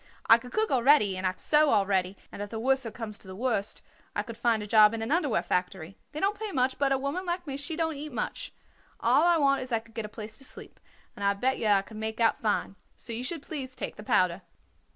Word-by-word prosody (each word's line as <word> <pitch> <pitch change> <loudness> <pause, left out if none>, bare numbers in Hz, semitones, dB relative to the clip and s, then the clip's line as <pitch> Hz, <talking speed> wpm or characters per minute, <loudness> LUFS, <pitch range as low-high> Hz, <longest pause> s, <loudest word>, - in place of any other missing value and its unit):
I 230 - +7
could 250 +1 -11
cook 435 0 0
already 250 -6 +4
and 185 0 -1
I 185 - 0
could - - -21
sew 300 0 +4
already, 195 -3 +1
and - - -8
if 205 - -5
the 225 - -5
worser 265 0 +2
comes 220 -2 -7
to - - -14
the 185 - -8
worst 220 -2 -1 0.3
I - - 0
could 230 - -8
find 225 -2 +1
a - - -5
job 215 0 +6
in 225 - -3
an 225 - -3
underwear 305 -7 +1
factory. 180 0 -2 0.2
They 300 - -5
don't 405 +3 0
pay 435 -2 -4
much, 260 -3 0
but 280 -1 +2
a 270 - +3
woman 280 +7 -3
like 350 0 -3
me 275 -3 -4
she 285 +4 -4
don't 320 -1 0
eat 300 +1 -6
much. 230 - -4 0.5
All - - +4
I 345 0 +4
want 275 -3 +3
is 255 0 -6
I 230 - +3
could 225 0 -11
get 225 -1 -4
a - - -7
place 215 +1 -8
to - - -7
sleep, - - -7 0.4
and 200 - -7
I 200 0 +3
bet 260 +6 0
yer 215 -2 +2
I 195 -1 +3
could 215 +1 -11
make 220 +1 -4
out 230 -1 +3
fine. 205 -2 -1 0.2
So 235 - -4
you 235 +2 -4
should 315 +2 -4
please 260 -4 -6
take - - -5
the - - -10
powder." 185 -3 +2
230 Hz, 265 wpm, -28 LUFS, 210-280 Hz, 0.5 s, I